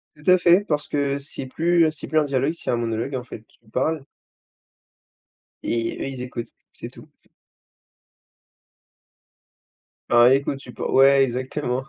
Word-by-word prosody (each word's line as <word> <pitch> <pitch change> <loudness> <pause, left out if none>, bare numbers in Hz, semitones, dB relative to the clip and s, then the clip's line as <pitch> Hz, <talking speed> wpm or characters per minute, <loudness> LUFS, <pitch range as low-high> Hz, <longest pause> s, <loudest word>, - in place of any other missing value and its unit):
Tout 150 +3 -3
à 185 - +7
fait, 180 +3 +4
parce 150 -1 -2
que, 140 -1 -1
c'est 140 -1 -6
plus, 165 +5 +2
heu, 155 - +1
c'est 155 - -8
plus 155 - +2
un 155 - +2
dialogue, 135 +1 0
c'est 170 - -6
un - - +2
monologue 115 +3 -3
en 125 - -4
fait, 110 -2 -11
tu - - -17
parles 145 +6 -1 1.6
et 115 0 -2
eux - - -3
ils 135 -2 -6
écoutent, 120 -2 -7 0.2
c'est - - -8
tout. - - -16 3.0
Bah 120 +1 +6
écoute, 140 0 0
tu 125 - -9
pou - - -7
ouais 135 0 +6
exactement. 130 +1 -3
135 Hz, 155 wpm, -22 LUFS, 125-150 Hz, 3.0 s, à